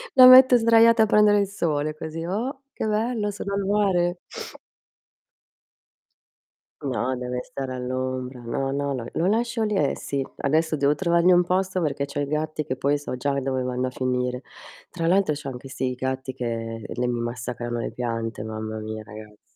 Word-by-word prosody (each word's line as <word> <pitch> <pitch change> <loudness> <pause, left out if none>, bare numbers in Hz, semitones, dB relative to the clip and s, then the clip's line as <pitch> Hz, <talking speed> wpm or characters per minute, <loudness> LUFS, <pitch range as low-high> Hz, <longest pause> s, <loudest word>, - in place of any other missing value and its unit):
La 255 -1 +10
metto 255 0 +9
sdraiata 230 0 +5
a - - +4
prendere 210 -1 +5
il 200 - +1
sole 155 -6 -1
così. 160 +1 -6
Oh, 245 - -3
che - - -3
bello 215 0 0
sono 200 0 -5
al 200 - 0
mare. 185 -4 +1 2.6
No, 130 -1 -1
deve 125 0 -4
stare 130 -2 -5
all'ombra. 130 0 -4
No, 135 +3 -2
no, 140 0 -1
lo 125 -3 -4
lo 170 - 0
lascio 230 +2 0
lì, 210 -1 0
e 145 -8 +1
sì. 140 -1 -3
Adesso 160 +3 +1
devo 145 0 +2
trovarmi 170 0 +3
un 180 0 +5
posto 185 0 0
perché 145 -3 -1
c'ho 140 +1 -5
i 145 - 0
gatti 155 0 -2
che 130 - -2
poi 140 +2 +1
so 145 -3 -5
già 140 +2 -1
dove 130 -1 -2
vanno 125 0 -1
a - - -2
finire. 125 0 -2 0.5
Tra 165 -2 -3
l'altro 190 -2 +3
c'ho 145 -1 -6
anche 130 +1 -9
sti 130 -1 -2
gatti 130 +1 -3
che 115 -3 -4
l 120 - -7
mi 120 -1 -1
massacrano 120 0 -4
le - - -3
piante, 115 -2 -3
mamma 110 0 -5
mia 110 0 -6
ragazzi. 105 0 -13
140 Hz, 180 wpm, -24 LUFS, 125-190 Hz, 2.6 s, La